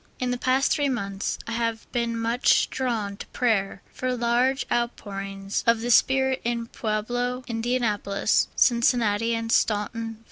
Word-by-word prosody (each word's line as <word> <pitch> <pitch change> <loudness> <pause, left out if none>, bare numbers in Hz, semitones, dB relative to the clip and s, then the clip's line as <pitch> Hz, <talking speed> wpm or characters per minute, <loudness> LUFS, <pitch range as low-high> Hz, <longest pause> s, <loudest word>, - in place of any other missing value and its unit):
In 250 -1 -1
the 245 - -1
past 260 +2 +2
three 290 -1 +2
months 200 -6 -3
I - - -6
have 230 -1 -2
been 235 -1 -1
much 230 +2 +2
drawn 220 -6 -2
to - - -9
pray 200 -6 0
for 255 -1 -2
large 245 +3 +1
outpourings 195 -4 -3
of 230 -1 +4
the 240 +1 -1
Spirit 265 +2 +3
in 235 0 -1
Pueblo, 245 +3 -2
Indianapolis, 225 -4 0
Cincinnati, 230 -2 +2
and 230 0 -3
Staunton, 225 +2 0
Va. 220 - -18
230 Hz, 145 wpm, -25 LUFS, 215-245 Hz, -, of